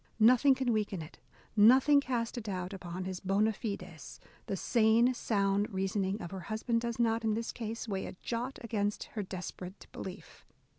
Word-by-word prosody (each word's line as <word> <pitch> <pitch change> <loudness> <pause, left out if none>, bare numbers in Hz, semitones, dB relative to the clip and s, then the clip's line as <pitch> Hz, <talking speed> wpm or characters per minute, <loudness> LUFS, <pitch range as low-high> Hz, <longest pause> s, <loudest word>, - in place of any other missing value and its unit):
Nothing 255 +4 +6
can 255 -2 0
weaken 205 -5 -1
it, 155 - -13 0.4
nothing 260 +7 +7
cast 240 -4 -2
a 240 - -3
doubt 185 -3 -4
upon 185 -1 -5
his 185 -1 -4
bona 205 +3 +2
fides: 190 -7 -6 0.3
the 195 - -2
sane, 230 +4 +4
sound 200 -3 +1
reasoning 195 +1 -1
of 170 - -6
her 190 - -5
husband 230 +2 0
does 235 -1 -3
not, 230 -1 +1
in 220 -1 +1
this 230 +1 -3
case, 230 0 -5
weigh 195 -3 -2
a - - -7
jot 245 +3 -3
against 205 -2 -1
her 215 - -2
desperate 185 0 -7
belief. 190 +1 -9
215 Hz, 170 wpm, -32 LUFS, 190-235 Hz, 0.4 s, nothing